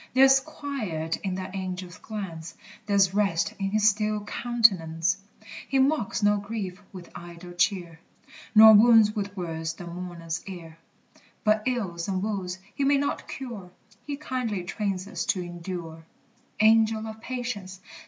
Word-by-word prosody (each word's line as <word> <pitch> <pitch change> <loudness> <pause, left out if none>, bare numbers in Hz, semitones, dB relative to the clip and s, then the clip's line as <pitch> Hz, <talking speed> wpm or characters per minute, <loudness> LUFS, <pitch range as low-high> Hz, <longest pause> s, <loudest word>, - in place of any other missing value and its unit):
There's 270 +1 +7
quiet 230 - -4
in 190 -2 -3
that 185 0 -6
Angel's 185 -2 -5
glance, 180 -7 -7 0.3
There's 200 -2 +3
rest 205 0 +1
in 195 0 -1
his 215 +1 +3
still 210 0 +1
countenance! 195 -7 +2 0.5
He 270 - 0
mocks 265 -5 +1
no 205 0 +4
grief 200 -2 -5
with 180 -3 -11
idle 175 +1 -10
cheer, 175 -2 0 0.6
Nor 220 0 +10
wounds 220 0 +6
with 200 -1 -4
words 160 -2 -3
the 175 - -9
mourner's 170 -1 -5
ear; 165 -4 -9 0.6
But 215 0 +3
ills 190 -10 -2
and 190 -1 -1
woes 190 -4 -3 0.2
he 280 - -2
may 280 +1 +4
not 285 +1 -2
cure 235 -9 -7 0.4
He 285 -1 -3
kindly 250 -9 -3
trains 195 0 -3
us 210 - -3
to 185 - +1
endure. 175 -2 -7 0.6
Angel 220 0 +4
of 220 0 -8
Patience! 230 -7 -5
200 Hz, 145 wpm, -26 LUFS, 175-220 Hz, 0.6 s, Nor